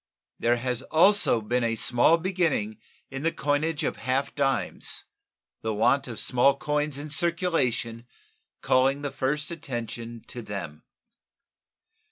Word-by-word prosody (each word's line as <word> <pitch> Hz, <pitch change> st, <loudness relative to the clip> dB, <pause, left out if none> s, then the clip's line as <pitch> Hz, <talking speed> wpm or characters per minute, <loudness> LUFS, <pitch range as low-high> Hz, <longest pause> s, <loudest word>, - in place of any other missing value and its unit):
There 120 Hz, +1 st, +2 dB
has 125 Hz, 0 st, -2 dB
also 165 Hz, -, +4 dB
been 120 Hz, +3 st, 0 dB
a 115 Hz, -1 st, 0 dB
small 120 Hz, +8 st, +4 dB
beginning 165 Hz, -, -1 dB, 0.3 s
in 135 Hz, 0 st, -5 dB
the 165 Hz, +2 st, +1 dB
coinage 150 Hz, +2 st, -1 dB
of -, -, -2 dB
half 130 Hz, +2 st, -1 dB
dimes, 135 Hz, -2 st, -2 dB, 0.6 s
the 110 Hz, -1 st, -2 dB
want 125 Hz, +6 st, +2 dB
of 115 Hz, -3 st, -6 dB
small 135 Hz, +2 st, +3 dB
coins 150 Hz, -1 st, -1 dB
in 145 Hz, +1 st, -6 dB
circulation 140 Hz, -8 st, 0 dB, 0.6 s
calling 135 Hz, +2 st, +2 dB
the 145 Hz, -, -2 dB
first 145 Hz, +4 st, -2 dB
attention 120 Hz, -7 st, -6 dB
to 120 Hz, -, -6 dB
them. 100 Hz, -8 st, -6 dB
135 Hz, 130 wpm, -26 LUFS, 120-150 Hz, 0.6 s, also